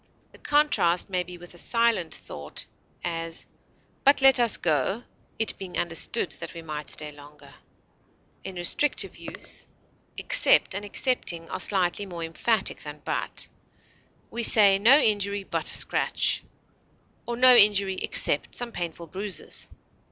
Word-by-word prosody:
The -, -, -18 dB
contrast 290 Hz, -, +1 dB
may 180 Hz, -1 st, 0 dB
be 180 Hz, 0 st, -9 dB
with 175 Hz, 0 st, -14 dB
a 175 Hz, -, -6 dB
silent 230 Hz, -7 st, +1 dB
thought; 75 Hz, 0 st, -9 dB, 0.4 s
as, 165 Hz, -1 st, -5 dB, 0.6 s
but 280 Hz, +1 st, +5 dB
let 270 Hz, -1 st, +6 dB
us 235 Hz, -3 st, +1 dB
go 170 Hz, -, -1 dB, 0.3 s
(it 225 Hz, -, 0 dB
being 190 Hz, -2 st, -7 dB
understood 170 Hz, +7 st, -2 dB
that -, -, -8 dB
we 165 Hz, -, -9 dB
might 150 Hz, -2 st, -7 dB
stay 150 Hz, 0 st, -5 dB
longer). 145 Hz, 0 st, -16 dB, 0.9 s
In 190 Hz, -, -8 dB
restrictive 175 Hz, +11 st, +1 dB
use, -, -, -6 dB, 0.5 s
except -, -, +5 dB
and 200 Hz, +2 st, -5 dB
excepting 200 Hz, -6 st, -2 dB
are 185 Hz, -, -4 dB
slightly 190 Hz, +1 st, -1 dB
more 170 Hz, -2 st, -7 dB
emphatic 190 Hz, +6 st, 0 dB
than 150 Hz, 0 st, -10 dB
but; -, -, -4 dB, 0.8 s
we 235 Hz, -, -3 dB
say, 200 Hz, -4 st, +5 dB
no 240 Hz, +7 st, +7 dB
injury 205 Hz, -6 st, 0 dB
but -, -, -1 dB
a -, -, +1 dB
scratch; -, -, 0 dB, 0.8 s
or, 235 Hz, -, -3 dB
no 255 Hz, 0 st, +7 dB
injury 200 Hz, -3 st, +4 dB
except -, -, +2 dB
some 240 Hz, -1 st, -4 dB
painful 170 Hz, -3 st, -6 dB
bruises. 190 Hz, +3 st, -6 dB
190 Hz, 140 wpm, -25 LUFS, 170-230 Hz, 0.9 s, no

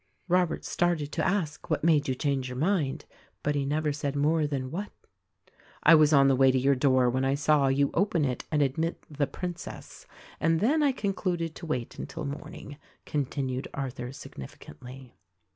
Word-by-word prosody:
Robert 180 Hz, -1 st, +1 dB
started 170 Hz, -4 st, 0 dB
to -, -, -1 dB
ask, 180 Hz, -7 st, -1 dB
What -, -, 0 dB
made 155 Hz, -3 st, +3 dB
you 130 Hz, -, 0 dB
change 135 Hz, -2 st, -1 dB
your 125 Hz, -, -6 dB
mind? 155 Hz, -3 st, 0 dB, 0.4 s
But 150 Hz, -, +1 dB
he 140 Hz, -1 st, -1 dB
never 150 Hz, +1 st, 0 dB
said 145 Hz, -1 st, -3 dB
more 150 Hz, +2 st, +2 dB
than 130 Hz, -3 st, -3 dB
"What." 200 Hz, +5 st, -4 dB, 0.9 s
"I -, -, +8 dB
was 155 Hz, -2 st, +6 dB
on 140 Hz, -2 st, +6 dB
the 135 Hz, -, +4 dB
way 135 Hz, +1 st, +5 dB
to 130 Hz, -, +1 dB
your 135 Hz, +2 st, +3 dB
door 130 Hz, -1 st, +3 dB
when 130 Hz, +2 st, 0 dB
I 135 Hz, +1 st, +2 dB
saw 145 Hz, -1 st, +3 dB
you 140 Hz, +1 st, +2 dB
open 170 Hz, -4 st, +1 dB
it 125 Hz, -2 st, -2 dB
and 150 Hz, -2 st, +3 dB
admit 160 Hz, +5 st, -2 dB
'The 145 Hz, -1 st, 0 dB
Princess'; 175 Hz, -1 st, -7 dB, 0.3 s
and 165 Hz, 0 st, +2 dB
then 285 Hz, -, +2 dB
I 285 Hz, -2 st, +4 dB
concluded 185 Hz, -7 st, -2 dB
to 170 Hz, -, -9 dB
wait 125 Hz, -6 st, -3 dB
until -, -, -5 dB
morning," 145 Hz, 0 st, -7 dB, 0.3 s
continued 135 Hz, -2 st, -2 dB
Arthur 130 Hz, -2 st, -4 dB
significantly. 125 Hz, -, -11 dB
145 Hz, 175 wpm, -28 LUFS, 135-165 Hz, 0.9 s, I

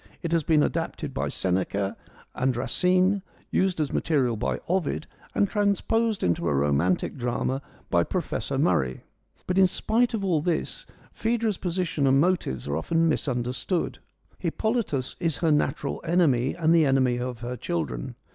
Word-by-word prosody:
It 170 Hz, -, -2 dB
has 165 Hz, -1 st, +3 dB
been 150 Hz, -1 st, +4 dB
adapted 160 Hz, -3 st, -2 dB
by -, -, -1 dB
Seneca 95 Hz, +2 st, -1 dB, 0.4 s
and 130 Hz, -1 st, 0 dB
Racine, 185 Hz, +8 st, +2 dB, 0.3 s
used 185 Hz, -3 st, +1 dB
as 150 Hz, -2 st, -1 dB
material 135 Hz, -7 st, +1 dB
by 110 Hz, -, -2 dB
Ovid 175 Hz, -4 st, 0 dB, 0.3 s
and 200 Hz, -, +3 dB
transposed 210 Hz, +2 st, +1 dB
into 85 Hz, -1 st, +1 dB
a 75 Hz, -, +1 dB
romantic 75 Hz, -, +1 dB
drama 125 Hz, +2 st, -1 dB, 0.3 s
by -, -, +4 dB
Professor -, -, -2 dB
Murray. 65 Hz, -1 st, +1 dB, 0.4 s
But 180 Hz, +1 st, +1 dB
in 190 Hz, -, +7 dB
spite 235 Hz, +6 st, +1 dB
of 200 Hz, -3 st, -2 dB
all 170 Hz, -5 st, +2 dB
this, 175 Hz, -, -2 dB, 0.3 s
Phaedra's 225 Hz, -3 st, 0 dB
position 175 Hz, -5 st, -1 dB
and 135 Hz, +1 st, +5 dB
motives 150 Hz, -, 0 dB
are 70 Hz, +1 st, -1 dB
often 165 Hz, -, +1 dB
mis 155 Hz, -, 0 dB
understood. 125 Hz, +7 st, -2 dB, 0.4 s
Hippolytus 220 Hz, -, -1 dB
is 165 Hz, -4 st, +2 dB
her 165 Hz, -2 st, +2 dB
natural 150 Hz, -1 st, 0 dB
enemy 155 Hz, -7 st, +2 dB
and 165 Hz, -1 st, +3 dB
the 160 Hz, -3 st, +5 dB
enemy 130 Hz, -2 st, +2 dB
of 125 Hz, -1 st, -4 dB
her 120 Hz, +1 st, -4 dB
children. 75 Hz, -, -3 dB
155 Hz, 155 wpm, -26 LUFS, 120-185 Hz, 0.4 s, in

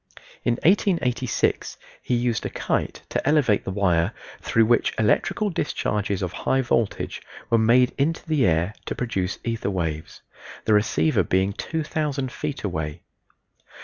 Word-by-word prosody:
In 120 Hz, -, +2 dB
1886 155 Hz, -, +1 dB, 0.2 s
he 125 Hz, -, 0 dB
used 120 Hz, -1 st, 0 dB
a -, -, -2 dB
kite -, -, -2 dB
to -, -, -2 dB
elevate 135 Hz, -9 st, +3 dB
the -, -, -3 dB
wire, 95 Hz, -1 st, +1 dB, 0.3 s
through 115 Hz, -1 st, +3 dB
which 120 Hz, +1 st, +2 dB
electrical 195 Hz, -, +1 dB
discharges 105 Hz, -, -1 dB
of 90 Hz, -1 st, -3 dB
high 135 Hz, +7 st, +1 dB
voltage 115 Hz, -3 st, -1 dB, 0.3 s
were 115 Hz, -, +5 dB
made 120 Hz, +3 st, +4 dB
into 160 Hz, +5 st, 0 dB
the 150 Hz, -5 st, +3 dB
air 85 Hz, +4 st, +1 dB
to -, -, -2 dB
produce 95 Hz, -6 st, -2 dB
ether 115 Hz, -3 st, -2 dB
waves 80 Hz, -5 st, -3 dB, 0.4 s
the 110 Hz, -, +3 dB
receiver 105 Hz, -7 st, +3 dB
being 95 Hz, +2 st, +1 dB
2000 150 Hz, -2 st, -2 dB
feet 150 Hz, 0 st, -5 dB
away. 80 Hz, -6 st, -3 dB
115 Hz, 140 wpm, -24 LUFS, 95-135 Hz, 0.4 s, were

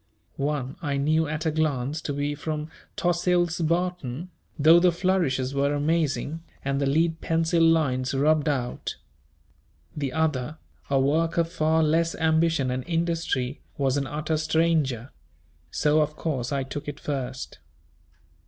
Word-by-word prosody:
One 140 Hz, -2 st, -2 dB
I 145 Hz, -3 st, -1 dB
knew 155 Hz, +3 st, +2 dB
at 155 Hz, +2 st, -3 dB
a 160 Hz, -, +2 dB
glance 150 Hz, -1 st, -1 dB
to 145 Hz, -, -3 dB
be 145 Hz, +1 st, -1 dB
from 155 Hz, +1 st, -4 dB, 0.2 s
Tossil's 175 Hz, -1 st, +1 dB
Barton, 170 Hz, -2 st, -1 dB, 0.3 s
though 160 Hz, +3 st, +7 dB
the 180 Hz, 0 st, +4 dB
flourishes 170 Hz, -8 st, 0 dB
were 140 Hz, +1 st, +1 dB
amazing, 155 Hz, +1 st, 0 dB, 0.2 s
and 140 Hz, 0 st, 0 dB
the 140 Hz, -, +1 dB
lead 160 Hz, +3 st, +1 dB
pencil 165 Hz, +1 st, +1 dB
lines 140 Hz, -6 st, +2 dB
rubbed 150 Hz, +2 st, +3 dB
out. 130 Hz, -4 st, -2 dB, 1.0 s
The 140 Hz, -3 st, -2 dB
other, 155 Hz, -1 st, -1 dB, 0.3 s
a 135 Hz, -1 st, +3 dB
work 160 Hz, +5 st, +1 dB
of 165 Hz, 0 st, +1 dB
far 160 Hz, -1 st, +2 dB
less 165 Hz, +2 st, +2 dB
ambition 160 Hz, -4 st, +2 dB
and 130 Hz, 0 st, -2 dB
industry, 165 Hz, -6 st, -1 dB, 0.2 s
was 135 Hz, -2 st, +1 dB
an 140 Hz, -1 st, -1 dB
utter 155 Hz, +2 st, -2 dB
stranger; 155 Hz, -6 st, +1 dB, 0.6 s
so 150 Hz, +1 st, +2 dB
of 150 Hz, 0 st, -1 dB
course 135 Hz, -7 st, -2 dB
I 140 Hz, -1 st, 0 dB
took 140 Hz, +2 st, -6 dB
it 145 Hz, -, -5 dB
first. 130 Hz, -3 st, -4 dB
155 Hz, 145 wpm, -26 LUFS, 140-165 Hz, 1.0 s, though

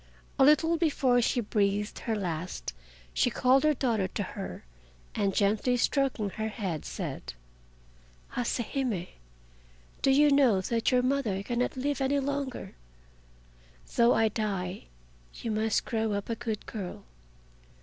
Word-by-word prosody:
A -, -, +7 dB
little 315 Hz, +4 st, +5 dB
before 275 Hz, -6 st, +3 dB
she 240 Hz, +1 st, +1 dB
breathed 205 Hz, -1 st, 0 dB
her 225 Hz, -, -2 dB
last 180 Hz, -, -4 dB, 0.4 s
she -, -, +3 dB
called 255 Hz, +3 st, +3 dB
her 305 Hz, -1 st, +4 dB
daughter 230 Hz, -7 st, +1 dB
to 205 Hz, -, -3 dB
her, 195 Hz, +1 st, -7 dB, 0.5 s
and 200 Hz, -1 st, +1 dB
gently 215 Hz, +5 st, +2 dB
stroking 245 Hz, -5 st, +1 dB
her 220 Hz, +2 st, -3 dB
head, 195 Hz, -8 st, -4 dB
said: -, -, -5 dB, 1.0 s
"Hase 245 Hz, -1 st, -1 dB, 0.2 s
Hime, 245 Hz, -, -1 dB, 1.0 s
do -, -, +3 dB
you 290 Hz, +2 st, +5 dB
know 265 Hz, -8 st, +5 dB
that 230 Hz, +4 st, 0 dB
your 250 Hz, -1 st, +3 dB
mother 250 Hz, -8 st, 0 dB
cannot 240 Hz, +4 st, -1 dB
live 285 Hz, +2 st, -1 dB
any 275 Hz, +1 st, +2 dB
longer? 280 Hz, -1 st, -3 dB, 1.2 s
Though 235 Hz, 0 st, +5 dB
I 225 Hz, -1 st, +3 dB
die, 195 Hz, -3 st, -3 dB, 0.5 s
you 230 Hz, -, -4 dB
must 215 Hz, 0 st, +1 dB
grow 220 Hz, -2 st, -1 dB
up 200 Hz, +3 st, -3 dB
a -, -, 0 dB
good 225 Hz, -2 st, -4 dB
girl. 180 Hz, -, -6 dB
230 Hz, 140 wpm, -29 LUFS, 205-265 Hz, 1.2 s, A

